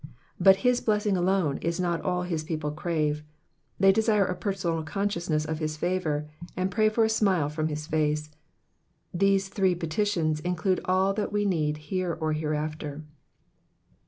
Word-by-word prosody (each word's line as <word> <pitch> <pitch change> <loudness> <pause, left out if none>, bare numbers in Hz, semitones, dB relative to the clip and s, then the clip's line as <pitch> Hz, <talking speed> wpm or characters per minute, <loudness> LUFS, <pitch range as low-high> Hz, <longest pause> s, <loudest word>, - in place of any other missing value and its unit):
But 190 +1 +7
his 250 0 +3
blessing 210 -2 +1
alone 180 -5 +1
is 170 +1 -2
not 175 -2 0
all 180 -1 -1
his 165 -3 -2
people 155 -2 -3
crave, 155 -2 -1 0.6
they 195 0 +7
desire 215 -1 +3
a 180 - -2
personal 175 -3 -2
consciousness 170 -3 -1
of 155 0 -3
his 155 -1 -3
favour, 155 -4 -1 0.3
and 185 +1 0
pray 215 0 +3
for 225 +1 +2
a - - +4
smile 195 -9 +2
from 155 +1 -1
his 150 -1 -4
face. 150 -1 0 0.8
These 195 +1 +2
three 190 -2 +1
petitions 165 -2 0
include 180 +2 0
all 190 +1 +2
that 210 0 -2
we 205 0 0
need 155 -6 0 0.2
here 180 -3 -1
or 155 -1 0
hereafter. 155 -1 -3
175 Hz, 160 wpm, -27 LUFS, 155-195 Hz, 0.8 s, But